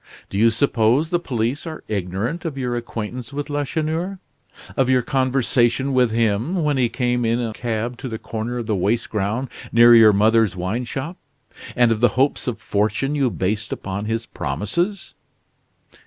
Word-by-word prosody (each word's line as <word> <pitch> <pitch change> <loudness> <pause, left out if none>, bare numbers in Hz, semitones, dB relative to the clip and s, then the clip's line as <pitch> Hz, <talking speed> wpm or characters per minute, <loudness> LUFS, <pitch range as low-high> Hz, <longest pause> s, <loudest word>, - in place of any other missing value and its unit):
Do 100 - -3
you 115 +2 +6
suppose 120 +5 +2
the 175 - +2
police 125 +1 -2
are 160 -1 -7
ignorant 105 - -3
of 160 -5 -4
your 125 -2 -2
acquaintance 120 +1 -5
with 145 +1 -5
Lacheneur 160 +6 -2 0.6
of 135 -2 +2
your 130 -1 +3
conversation 130 0 +1
with 125 -2 +4
him 115 - 0
when 150 -1 +1
he 125 -3 +2
came 125 0 0
in 115 +1 +1
a 115 -2 -2
cab 120 +1 -3
to 135 - -5
the 115 -3 -4
corner 115 +2 -4
of 120 - -3
the 110 - 0
waste 100 +5 0
ground 110 +5 -1 0.2
near 120 +1 +7
your 110 -2 +8
mother's 110 0 +3
wine 95 +8 -2
shop; 135 +9 -5 0.6
and 120 -1 +4
of 110 - +1
the 120 0 +2
hopes 135 +1 +1
of 120 -3 -2
fortune 110 +7 0
you 140 -4 +2
based 105 +1 -2
upon 100 +2 -4
his 115 +1 -2
promises? 105 - -3
120 Hz, 170 wpm, -21 LUFS, 110-135 Hz, 0.6 s, your